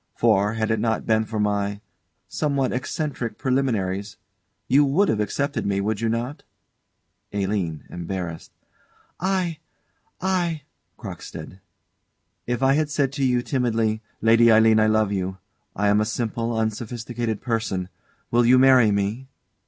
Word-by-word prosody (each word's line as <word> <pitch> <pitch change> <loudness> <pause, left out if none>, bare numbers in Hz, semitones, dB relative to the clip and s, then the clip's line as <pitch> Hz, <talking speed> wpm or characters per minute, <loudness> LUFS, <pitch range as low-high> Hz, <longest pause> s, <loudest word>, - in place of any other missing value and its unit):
For, 105 -2 +3
had 110 -1 -1
it 110 - +1
not 110 0 0
been 110 0 +2
for 110 0 -4
my 100 -1 0 0.5
somewhat 140 -4 0
eccentric 125 -3 -3
preliminaries 105 -7 -1 0.5
you 145 +2 +5
would 160 +9 +2
have 105 - +1
accepted 140 +7 -1
me, 100 -1 0
would 105 +2 -1
you 115 - +1
not? 120 +5 -3 0.9
ALINE. 95 -6 -2
[Embarrassed.] 85 -1 -5 0.7
I 180 -3 -1 0.6
I 175 -5 -1 0.3
CROCKSTEAD. 95 - -9 0.9
If 120 +1 -1
I 135 0 +5
had 155 +1 +1
said 145 -2 0
to 140 0 -3
you, 125 -2 +2
timidly: 115 -5 0 0.2
"Lady 115 +1 +6
Aline, 110 0 +6
I 110 - +4
love 110 -1 +2
you: 95 -1 -2 0.4
I 105 +1 +1
am 105 +1 +4
a - - +1
simple, 115 0 -2
unsophisticated 115 0 -3
person; 110 -6 -2 0.4
will 120 +1 +4
you 125 +2 +6
marry 130 -3 +6
me?" 105 +6 -1
115 Hz, 135 wpm, -23 LUFS, 105-130 Hz, 0.9 s, Lady